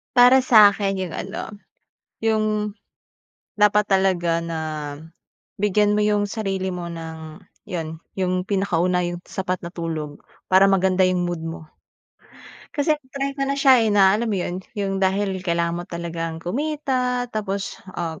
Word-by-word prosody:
Para 250 +2 +8
sa’kin, 205 -5 +5
‘yong 185 -2 -3
ano, 200 +4 -6 0.6
‘yong 215 -2 0 0.9
dapat 210 0 +3
talaga 180 -3 +2
na 165 -1 -4 1.0
bigyan 210 0 +3
mo 210 - +2
‘yong 210 -1 +2
sarili 195 -3 -2
mo 175 -1 -5
ng 160 0 -8 0.2
‘yon, 160 -4 -5 0.2
‘yong 185 -1 -1
pinakauna, 180 -2 +1
‘yong 175 0 -3
sapat 185 -1 -3
na - - -7
tulog 160 -4 -5 0.2
para 190 +1 +5
maganda 190 -1 +3
‘yong 180 -1 +1
mood 170 -2 -4
mo. 165 -1 -7 1.1
Kasi 290 +2 +2
na-try 275 +1 -4
ko 275 0 -2
na 275 - 0
siya, 265 -3 +6
eh, 225 - +2
na 195 -2 +5
alam 225 +3 0
mo 205 - 0
‘yon, 180 0 -3 0.2
‘yong 195 -1 -1
dahil 190 0 0
kailangan 170 -1 -1
mo - - -6
talagang 165 -1 -4
kumita, 255 - -1
tapos, 200 -2 -3 0.2
ah, 165 -2 -4
190 Hz, 145 wpm, -22 LUFS, 175-210 Hz, 1.1 s, Para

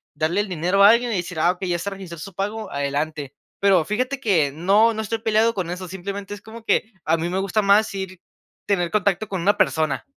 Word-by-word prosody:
darle 160 +6 0
el 205 - -4
dinero 180 +3 +2
a 200 - +9
alguien 235 +2 +3
y 215 - 0
decir: 175 -2 -4
"Ah, 165 - +4
okey, 185 +1 -6
ya 175 - +1
está 170 +4 -3
registrado 190 -4 -9
su 195 +4 -8
pago, 210 +1 -4
adelante". 140 0 -3 0.3
Pero, 195 -4 +4
fíjate 250 - -2
que 175 - +2
no, 200 +8 +3
no 220 - -3
estoy 220 +1 -2
peleado 220 +1 +2
con 180 -3 -3
eso, 180 0 -6
simplemente, 195 +2 -6
es 205 - -13
como 225 +1 -11
que 225 0 0
a 165 +1 +2
mí 165 +1 -2
me 185 +2 -1
gusta 200 +2 0
más 200 +2 +4
ir 190 -2 -6 0.5
tener 180 -4 0
contacto 205 0 +1
con 190 -3 -3
una 200 +4 +2
persona. 155 -4 +1
195 Hz, 230 wpm, -22 LUFS, 170-215 Hz, 0.5 s, a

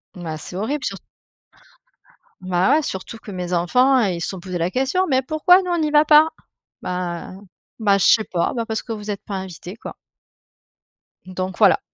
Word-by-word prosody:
Bah, 165 -3 -6
c'est 180 - -10
horrible, 265 +9 -2
sur - - -3 1.4
bah, 185 +4 +1
ouais, 315 - +3
surtout 190 -2 -6
que 215 - -11
mes 180 -1 -4
enfants, 250 +10 +3
ils 185 -6 -1
se - - -2
sont 190 - -6
posé 180 0 -5
la 170 +1 -1
question. 270 - 0
«Mais 260 -2 +3
pourquoi 310 +7 +4
nous 365 -1 -4
on 345 - +1
n'y 310 -2 0
va 300 0 +5
pas?» 305 +1 +6 0.5
Bah 180 -1 -4 0.5
bah, 205 -3 +3
je 195 - +1
sais 220 - +5
pas. 175 -5 -1
Bah, 235 -2 -2
parce 220 -1 -3
que - - -8
vous 210 -1 -7
êtes 200 - -5
pas 200 - -6
invités, 190 0 -7
quoi. - - -9 1.3
Donc 185 0 -5
voilà. - - +5
200 Hz, 190 wpm, -21 LUFS, 180-265 Hz, 1.4 s, pas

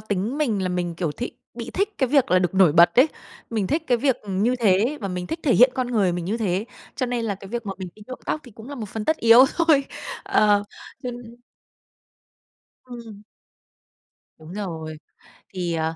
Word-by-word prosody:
tính 210 +6 -2
mình 220 -10 0
là 185 - -1
mình, 175 -2 -2
kiểu, 165 -3 -2
th 240 - -9 0.3
bị 235 -1 -6
thích 405 +2 -2
cái 260 -3 +2
việc 275 -6 +3
là 185 - +5
được 180 0 -1
nổi 185 -6 +5
bật 170 +1 +6
ấy, 285 +5 +7 0.4
mình 215 -4 -1
thích 305 - 0
cái 245 - +3
việc, 265 0 +2
ừm, 195 -1 -2
như 250 +3 +2
thế, 225 +6 +2
và 195 - -3
mình 180 -1 -4
thích 325 - -5
thể 275 - +3
hiện 250 +3 +7
con 255 -2 -1
người 210 -7 +1
mình 175 -1 -3
như 205 +5 -1
thế. 200 -3 -1 0.3
Cho 255 - -1
nên 240 -2 -2
là 205 - -1
cái 195 0 -12
việc 235 +1 -5
mà 195 - -2
mình 185 -1 -6
đi 215 - -15
nhuộm 255 - -7
tóc 310 - -1
thì 245 - -13
cũng 220 +3 -12
là 285 - -6
một 220 -6 -6
phần 215 0 -5
tất 315 - +1
yếu 230 +1 +7
thôi. 315 -5 +4 0.4
Ờ, 205 -1 +3 0.4
cho 250 - -3
nên 240 0 -11 1.5
Ừm. 230 -4 -10 1.2
Đúng 155 +2 -12
rồi. 160 -6 -5 0.6
Thì, 180 -2 -2
à, 160 0 -1
215 Hz, 220 wpm, -23 LUFS, 185-250 Hz, 1.5 s, ấy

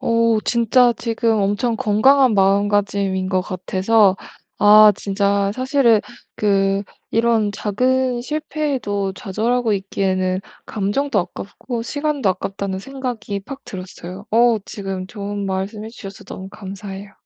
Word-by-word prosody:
어 230 -3 +2
진짜 240 +1 +4
지금 230 0 -1
엄청 205 +4 0
건강한 250 +4 +4
마음가짐인 200 -1 +1
것 185 -1 +1
같아서 190 +2 +2 0.4
아 210 0 +8
진짜 200 0 0
사실은 255 -4 +3 0.4
그 195 -1 +1 0.3
이런 225 -2 +2
작은 250 +5 0
실패에도 265 -9 -2
좌절하고 225 +4 -1
있기에는 190 -1 -1 0.3
감정도 215 +4 -1
아깝고 230 +6 -6
시간도 285 -2 -1
아깝다는 190 +1 -3
생각이 245 -4 -5
팍 275 +7 -10
들었어요. 185 0 -9
어 230 0 +4
지금 195 -2 -5
좋은 205 -1 -5
말씀 195 +3 -3
해 - - -6
주셔서 195 -4 -10
너무 190 0 -8
감사해요. 195 0 -9
205 Hz, 280 characters per minute, -20 LUFS, 195-235 Hz, 0.4 s, 아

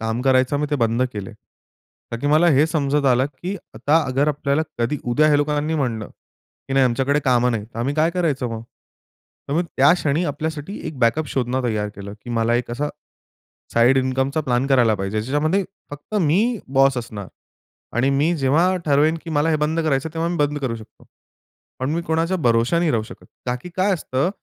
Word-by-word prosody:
काम 115 +2 -2
करायचं 130 +2 +3
मी 150 - 0
ते - - +1
बंद 115 +2 +2
केले. 100 -3 -6 0.8
का 115 - -3
की 145 - -2
मला 165 +3 +5
हे 150 - +5
समजत 145 -3 0
आलं, 130 +1 +3
की 185 +3 -3 0.2
आता 145 +8 +2
अगर 140 +3 +2
आपल्याला 145 +1 0 0.2
कधी 130 +5 0
उद्या 155 +6 +4
ह्या 145 - +4
लोकांनी 150 +2 0
म्हटलं 115 -5 -2 0.6
की - - -3
"नाही 135 -1 +5
आमच्याकडे 135 +4 +1
कामं 125 -1 +3
नाही." 110 -3 -2
तर 115 +1 -11
आम्ही 135 +5 -1
काय 160 +2 +2
करायचं 155 -8 -1
मग? 110 0 -5 0.9
तर - - -2
मग 170 +2 +1
त्या 135 +4 +6
क्षणी 155 0 0
आपल्यासाठी 155 +5 -4
एक 145 - -9
बॅकअप 140 +6 +2
शोधणं 130 0 -1
तयार 105 -3 -1
केलं, 100 0 -8
की 120 - -7
मला 115 +1 +2
एक 120 0 -1
असा 145 +5 -2 0.9
साइड 120 +3 +5
इन्कमचा 130 +3 0
प्लॅन 125 +2 +1
करायला 120 -5 +4
पाहिजे. 100 +2 -2
ज्याच्यामध्ये 155 - 0 0.3
फक्त 145 +9 -7
मी 165 +7 +3 0.4
बॉस 135 -1 +5
असणार 110 -5 -6 0.7
आणि 130 +3 +3
मी 165 +4 +2
जेव्हा 155 +7 +2
ठरवेन, 150 +3 +3
की 165 - -7
मला 155 +1 +1
हे 155 - +2
बंद 160 +2 -1
करायचं, 155 0 0
तेव्हा 165 +1 -1
मी 175 - -2
बंद 145 0 0
करू 130 -4 -2
शकतो. 110 -1 -14 0.7
पण 130 +2 -1
मी 170 - -1
कोणाच्या 165 +3 +1
भरोशा 120 +3 +2
नाही 170 -3 +2
राहू 110 -2 0
शकत. - - -13 0.2
का 125 0 0
की 180 - -9
काय 190 +2 +2
असतं, 140 -1 -1
140 Hz, 195 wpm, -21 LUFS, 120-155 Hz, 0.9 s, त्या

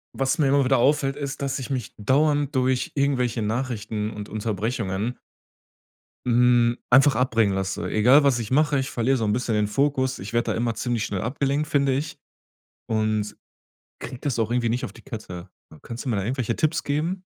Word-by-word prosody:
Was 135 0 0
mir 145 -3 +2
immer 140 0 +4
wieder 135 +1 +3
auffällt, 135 +2 +2
ist, 140 -1 -5
dass 140 0 -1
ich 135 +1 -6
mich 125 -3 -4
dauernd 145 +5 +1
durch 130 -1 +1
irgendwelche 125 -5 0
Nachrichten 110 -2 -2
und 105 -1 -8
Unterbrechungen 110 +1 -2 1.1
hm, 120 0 +3
einfach 135 +3 +6
abbringen 115 -5 +2
lasse. 95 0 -2
Egal, 125 +7 +5
was 135 -4 +3
ich 110 -2 -5
mache, 145 +1 +2
ich 135 +1 -2
verliere 130 +2 +1
so 115 - -1
'n 105 - +1
bisschen 120 -1 -1
den 105 0 +1
Fokus. 130 +2 0
Ich 100 +4 -7
werd 120 0 0
da - - +1
immer 115 0 -1
ziemlich 115 0 -2
schnell 95 -3 -3
abgelenkt, 140 +4 -1
finde 140 -2 +2
ich. 145 +4 -3 0.7
Und, 110 -1 -1 0.6
krieg 125 - -8
das 140 -5 -2
auch 115 0 0
irgendwie 120 -1 +1
nicht 120 +2 -1
auf - - -9
die - - -15
Kette. 100 -8 -8 0.3
Kannst 120 +4 -7
du - - -2
mir 110 - 0
da 100 - -1
irgendwelche 120 +1 -2
Tipps 155 0 0
geben? 165 +6 -2
125 Hz, 190 wpm, -24 LUFS, 110-140 Hz, 1.1 s, einfach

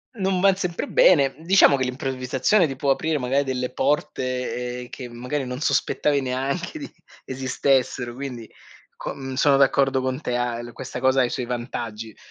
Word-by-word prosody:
Non 190 -3 0
van 195 -1 +5
sempre 180 -3 -3
bene. 140 -6 +5
Diciamo 170 -4 +5
che 130 - 0
l'improvvisazione 130 +7 +1
ti 135 - -5
può 140 +1 -2
aprire 160 +2 0
magari 135 +2 0
delle 125 -1 -2
porte, 125 -3 -2
ehm, 125 - -12
che 125 -2 -7
magari 125 +4 -4
non 125 +2 -5
sospettavi 150 -2 +1
neanche 135 - -3
di 285 - -8 0.3
esistessero 130 -1 0
quindi 125 -4 -7 0.5
co 135 -1 -6
sono 145 -1 +4
d'accordo 135 -1 +3
con 130 +1 -2
te 125 -5 -3
a 120 -1 -1
el 120 -1 -8
questa 125 - -6
cosa 130 +1 +3
ha - - +4
i 120 - 0
suoi 125 -3 -3
vantaggi 115 -3 -5
130 Hz, 170 wpm, -23 LUFS, 125-140 Hz, 0.5 s, van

